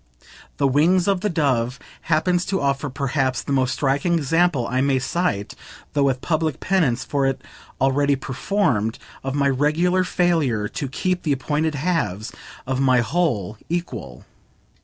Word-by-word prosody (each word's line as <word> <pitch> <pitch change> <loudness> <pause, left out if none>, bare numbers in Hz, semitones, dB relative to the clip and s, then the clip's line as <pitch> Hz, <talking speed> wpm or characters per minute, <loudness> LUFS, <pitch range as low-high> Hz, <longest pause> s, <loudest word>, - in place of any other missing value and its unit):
"The 140 - +3
Wings 170 +7 +3
of 195 -2 +2
the 210 - 0
Dove" 135 -7 0 0.3
happens 175 +3 +2
to 195 - -1
offer 140 +1 0
perhaps 135 -1 -1
the - - -5
most 130 -2 +2
striking 140 +5 +1
example 165 -3 +2
I 130 +1 0
may 135 -1 +2
cite 130 - -1 0.4
(though 145 - +1
with 130 -2 0
public 160 -2 -1
penance 160 -10 +1
for 140 -2 0
it 135 0 -1 0.4
already 140 +2 +2
performed) 130 - -1 0.3
of 135 +1 -3
my 140 -1 +2
regular 155 +7 +2
failure 160 -12 +1
to 140 - -4
keep 180 +7 -1
the 150 - +1
appointed 150 +3 -1
halves 145 - -1 0.3
of 130 0 -1
my 130 -2 +4
whole 115 - -1
equal. 120 - -4
140 Hz, 150 wpm, -22 LUFS, 130-170 Hz, 0.4 s, my